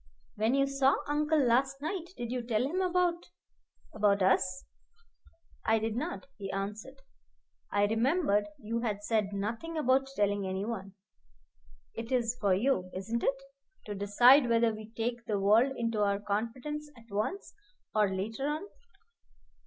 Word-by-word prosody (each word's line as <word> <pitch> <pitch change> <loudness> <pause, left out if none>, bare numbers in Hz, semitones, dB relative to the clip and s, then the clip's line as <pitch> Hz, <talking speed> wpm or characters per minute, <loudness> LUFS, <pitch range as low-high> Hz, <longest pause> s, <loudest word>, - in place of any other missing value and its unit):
"When 220 +4 +1
you 275 0 +3
saw 275 0 +3
uncle 300 +2 +1
last 270 +1 +2
night, 325 +4 -3
did 240 -1 -4
you 250 -1 -1
tell 235 -1 0
him 335 +8 -1
about 355 -1 0 0.6
about 205 -2 +2
us?" 185 0 +2 1.0
"I 225 - +3
did 220 0 -2
not," 200 -5 -4
he 195 -1 -5
answered. 210 +7 -5 0.8
"I 205 0 +3
remembered 225 - +2
you 230 +2 -3
had 210 -3 -2
said 210 -2 0
nothing 225 +12 -4
about 270 -2 +2
telling 205 -2 +1
any 190 +1 -2
one. 200 -4 -5 1.0
It 230 +2 -6
is 245 -2 +1
for 200 -3 +3
you 195 -4 +1
isn't 225 +5 -2
it? 270 0 0 0.4
to 210 - -4
decide 240 +7 +5
whether 230 -1 +3
we 215 0 -9
take 235 +1 -3
the 210 -3 0
world 220 +7 +4
into 230 -2 -1
our 200 -1 +2
confidence 235 +9 -3
at 230 - -16
once 215 - -3 0.4
or 210 -2 +3
later 220 +8 -3
on." 300 +3 -2
230 Hz, 150 wpm, -31 LUFS, 205-270 Hz, 1.0 s, decide